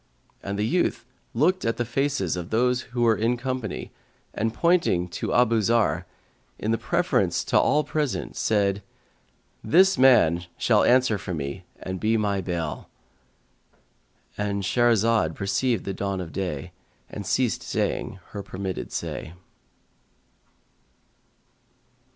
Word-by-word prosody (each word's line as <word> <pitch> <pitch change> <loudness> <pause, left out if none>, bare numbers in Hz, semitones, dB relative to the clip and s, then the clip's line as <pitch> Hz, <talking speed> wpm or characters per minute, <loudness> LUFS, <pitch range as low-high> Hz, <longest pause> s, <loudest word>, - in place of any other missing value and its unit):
And 100 0 -4
the 105 - 0
youth 175 -3 0 0.3
looked 180 +9 +2
at 115 0 0
the 120 - -1
faces 120 - -1
of 90 -1 -5
those 125 +2 +2
who 120 0 -1
were 115 -2 +4
in 115 +3 0
company 130 -4 -4 0.4
and 110 +2 -1
pointing 165 - +2
to - - -4
Abu 115 -2 +3
Zarr,[FN#149] 115 +1 +1 0.5
in 110 +2 0
preference - - +1
to - - +3
all 150 +1 +3
present, 150 -4 -2
said, 100 -2 +1 0.8
"This 190 -2 +4
man 90 -10 +5
shall - - +3
answer 125 -4 +3
for 90 -2 -4
me 75 +5 -5
and 95 0 -5
be 110 +3 +2
my 100 -2 0
bail."—And 95 +2 -8
Shahrazad 115 -5 +2
perceived 100 +3 0
the 95 - -3
dawn 100 0 -3
of 85 -3 -6
day 90 -8 -4 0.4
and - - -7
ceased - - 0
saying - - -2
her 100 - -6
permitted 95 -1 -5
say. 80 - -5
110 Hz, 125 wpm, -25 LUFS, 95-120 Hz, 0.8 s, man